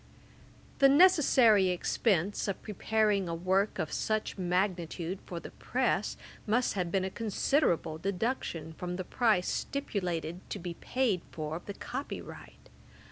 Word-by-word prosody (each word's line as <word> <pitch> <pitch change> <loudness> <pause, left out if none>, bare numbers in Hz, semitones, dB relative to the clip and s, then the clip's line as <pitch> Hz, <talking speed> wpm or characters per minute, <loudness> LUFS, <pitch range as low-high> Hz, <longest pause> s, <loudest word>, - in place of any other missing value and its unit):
The 275 - +7
necessary 270 - +6
expense 190 +2 0
of 195 - -3
preparing 210 -2 +1
a 165 - -2
work 190 +4 +1
of - - -2
such 215 -1 -1
magnitude 180 -1 -1
for 175 - -5
the - - -10
press, - - -1 0.3
must 240 +4 +2
have 180 -3 -2
been 190 0 +1
a 190 - -3
considerable 210 - 0
deduction 180 -4 -2
from 180 +2 -5
the 185 - -3
price 215 -3 +2
stipulated 180 - -2
to - - -3
be 175 -2 -5
paid 225 -1 0
for 155 +1 -4
the 200 - -7
copy 270 +3 -5
right. - - -12
190 Hz, 135 wpm, -30 LUFS, 175-220 Hz, 0.3 s, The